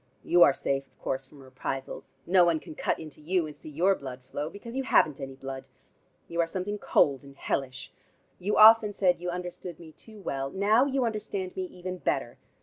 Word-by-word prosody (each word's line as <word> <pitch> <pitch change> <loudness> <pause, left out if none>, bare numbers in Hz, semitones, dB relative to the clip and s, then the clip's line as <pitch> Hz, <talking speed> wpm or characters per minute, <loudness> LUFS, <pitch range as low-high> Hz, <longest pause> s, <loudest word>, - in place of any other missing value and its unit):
You 175 0 +3
are 145 - +9
safe, 135 0 -2
of - - -36
course, 135 0 -3
from 140 -1 -16
reprisals. 130 +1 -6
No 180 0 +5
one 170 -2 +2
can - - -10
cut - - -1
into 155 -1 -10
you, 175 +2 0
and 150 -1 -9
see 150 - -11
your 175 +7 +3
blood 130 -6 -8
flow, 145 +4 -4
because 230 +6 -10
you 270 - 0
haven't 155 - +3
any 135 0 -6
blood. 135 0 -7 0.6
You 170 0 0
are 165 - 0
something 195 +4 -4
cold 140 -7 +2
and 140 0 -14
hellish. 130 -2 -3 0.5
You 200 +4 -1
often 215 -1 +8
said 180 -3 +2
you 180 - -3
understood 180 -1 -6
me 165 -2 -12
too 215 +6 -13
well. 135 -7 -3
Now 210 - +3
you 270 -2 0
understand 205 -4 -3
me 185 - -2
even 180 0 -7
better. 125 -7 -2
170 Hz, 205 wpm, -28 LUFS, 135-190 Hz, 0.6 s, are